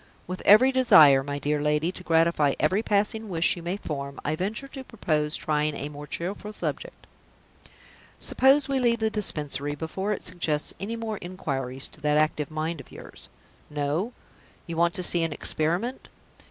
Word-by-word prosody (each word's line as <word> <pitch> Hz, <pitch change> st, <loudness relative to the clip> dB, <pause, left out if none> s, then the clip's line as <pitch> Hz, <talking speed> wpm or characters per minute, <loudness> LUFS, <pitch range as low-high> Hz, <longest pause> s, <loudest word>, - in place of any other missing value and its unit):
"With 185 Hz, +1 st, -6 dB
every 235 Hz, +6 st, +8 dB
desire, 155 Hz, -, +7 dB
my 145 Hz, +1 st, -4 dB
dear 150 Hz, +1 st, -1 dB
lady, 150 Hz, +3 st, +1 dB
to 185 Hz, -, -11 dB
gratify 165 Hz, -4 st, +3 dB
every 185 Hz, +7 st, +2 dB
passing 215 Hz, +1 st, 0 dB
wish 170 Hz, -2 st, +2 dB
you 175 Hz, -, -8 dB
may 175 Hz, +3 st, -3 dB
form, 140 Hz, -6 st, -5 dB
I 150 Hz, -, 0 dB
venture 210 Hz, +10 st, -3 dB
to 270 Hz, -1 st, -8 dB
propose 155 Hz, -11 st, -1 dB
trying 150 Hz, -1 st, 0 dB
a 145 Hz, -, -5 dB
more 150 Hz, 0 st, -9 dB
cheerful 200 Hz, +6 st, -5 dB
subject. -, -, -5 dB, 1.1 s
Suppose 270 Hz, +1 st, +3 dB
we 275 Hz, -1 st, 0 dB
leave 240 Hz, -2 st, +2 dB
the 220 Hz, -1 st, 0 dB
Dispensary, 145 Hz, -8 st, -1 dB
before 180 Hz, +7 st, -3 dB
it 210 Hz, -, -3 dB
suggests 160 Hz, -4 st, -1 dB
any 210 Hz, +4 st, -4 dB
more 225 Hz, -2 st, -4 dB
inquiries 135 Hz, -7 st, -4 dB
to -, -, -15 dB
that 150 Hz, 0 st, +2 dB
active 155 Hz, -1 st, +1 dB
mind 155 Hz, 0 st, -3 dB
of -, -, -19 dB
yours? -, -, -12 dB, 0.4 s
No? 150 Hz, -, -2 dB, 0.5 s
You 170 Hz, -, -5 dB
want 170 Hz, +3 st, +2 dB
to 185 Hz, -, -3 dB
see 175 Hz, -1 st, -1 dB
an 165 Hz, -2 st, -1 dB
experiment? 175 Hz, -, -2 dB
170 Hz, 170 wpm, -26 LUFS, 150-210 Hz, 1.1 s, every